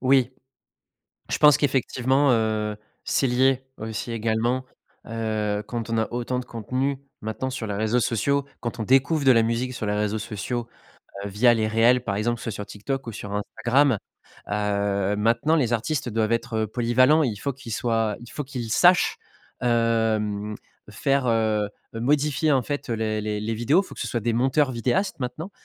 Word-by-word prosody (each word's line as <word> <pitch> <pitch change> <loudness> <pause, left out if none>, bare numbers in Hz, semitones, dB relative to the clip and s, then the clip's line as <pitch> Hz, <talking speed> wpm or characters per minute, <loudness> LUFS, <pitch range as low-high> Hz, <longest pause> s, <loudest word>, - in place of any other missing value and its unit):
Oui. 130 -1 +3 1.0
Je - - 0
pense 150 -2 +7
qu'effectivement, 135 0 +2
heu, 110 -2 0 0.3
c'est 135 - +1
lié, 130 +1 +2
aussi, 110 +2 -5
également, 115 +3 0 0.4
heu, 110 -2 -1
quand 115 -2 -4
on 115 - 0
a 110 - +1
autant 125 +1 -2
de 125 - -6
contenus, 130 +5 -2 0.2
maintenant, 110 +4 -3
sur 125 -3 -4
les 105 - -3
réseaux 110 +4 +1
sociaux, 140 +5 +1
quand 120 0 -5
on 110 - -1
découvre 135 +5 +3
de 130 - +7
la 115 -2 +5
musique 115 +3 -1
sur 110 - -4
les 105 - 0
réseaux 105 +1 -1
sociaux, 115 +3 -4 0.6
heu, - - -2
via 115 +5 +4
les 110 -2 +1
réels, 115 +3 +3
par 100 -5 -2
exemple, 120 +3 -1
soit 115 - -4
sur 105 0 -6
TikTok 125 +6 -5
ou 115 - -3
sur 100 -1 -7
Instagram, 120 +4 +2 0.5
heu, 100 -1 0
maintenant, 115 +9 +2
les 125 -7 +1
artistes 125 +2 -1
doivent 110 0 0
être, 115 +1 -1
heu, - - -2
polyvalents 130 +7 +3
et - - +2
il 105 -4 -3
faut 140 +6 -3
qu'ils 125 -4 -8
soient 115 -3 0
il 120 - -12
faut 150 - -4
qu'ils 125 -5 -5
sachent, 180 +5 +4 0.4
hem, 110 -3 +1 0.3
faire, 135 +5 0
heu 110 -3 +1 0.3
heu - - -3
modifier, 150 +4 +2
en 130 - +3
fait, 145 +1 -4
les 110 -2 -1
les 105 0 -2
les 110 +2 -2
vidéos. 120 - +3
Il 200 - -9
faut - - -11
que - - -11
ce - - -2
soit 120 - -1
des 120 - 0
monteurs 130 +3 +2
vidéastes 130 - -1
maintenant. 135 +9 -5
115 Hz, 185 wpm, -24 LUFS, 110-130 Hz, 1.0 s, pense